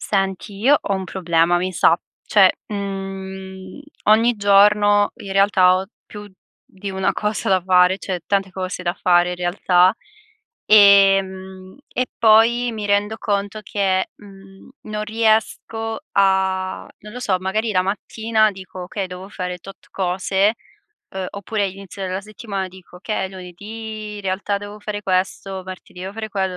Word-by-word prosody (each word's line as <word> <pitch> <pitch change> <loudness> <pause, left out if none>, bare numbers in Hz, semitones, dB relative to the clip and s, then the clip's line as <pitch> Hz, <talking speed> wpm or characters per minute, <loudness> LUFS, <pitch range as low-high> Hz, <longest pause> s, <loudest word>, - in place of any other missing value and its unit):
Senti, 195 +1 -2
io 270 +8 +5
ho 200 - -2
un 190 -1 -3
problema, 175 -2 +1
mi 185 +1 -1
sa. 170 -1 +4 0.3
Cioè 195 -3 +6 0.2
uhm, 190 0 -6 0.2
ogni 225 +3 +4
giorno, 205 0 +4
in 195 - -7
realtà, 195 -2 +4
ho 190 +1 -3 0.2
più 205 -1 -11 0.3
di 195 +1 -8
una 190 0 0
cosa 210 -2 -2
da 190 -2 +3
fare, 180 +1 +4
cioè, 185 -3 -4
tante 195 -1 0
cose 185 -1 -5
da 175 -1 0
fare, 175 0 +3
in 180 - -4
realtà. 180 +1 +3 0.7
Ehm 195 -2 +4 0.2
e 255 - +1
poi 230 +2 +4
mi 215 -2 -4
rendo 205 +2 +1
conto 205 0 -2
che, 190 -3 0
mhmm, 195 0 -16
non 215 0 -4
riesco 225 0 0
a 190 -1 +1
non 210 +1 -12
lo 250 - -7
so, 190 -6 0
magari 215 +4 -1
la 185 -2 +2
mattina 215 +2 0
dico: 185 -2 -9
"Okay, 195 +2 -4
devo 180 +1 -9
fare 180 -3 -5
tot 195 +3 -14
cose". 190 +3 +1 0.6
Uhm, 190 -1 -4
oppure, 200 0 -2
inizio 195 0 -9
della 185 +1 -3
settimana, 200 -2 -5
dico: 185 -1 -15
"Okay, 205 +1 -3
è - - -9
lunedì, 210 +4 -8
in - - -7
realtà, 195 +1 -1
devo 205 +1 -9
fare 205 0 -5
questo, 190 0 -1
martedì 185 -1 -10
devo 190 +1 -6
fare 220 0 -5
quello". 190 -3 -2
195 Hz, 155 wpm, -20 LUFS, 185-210 Hz, 0.7 s, Cioè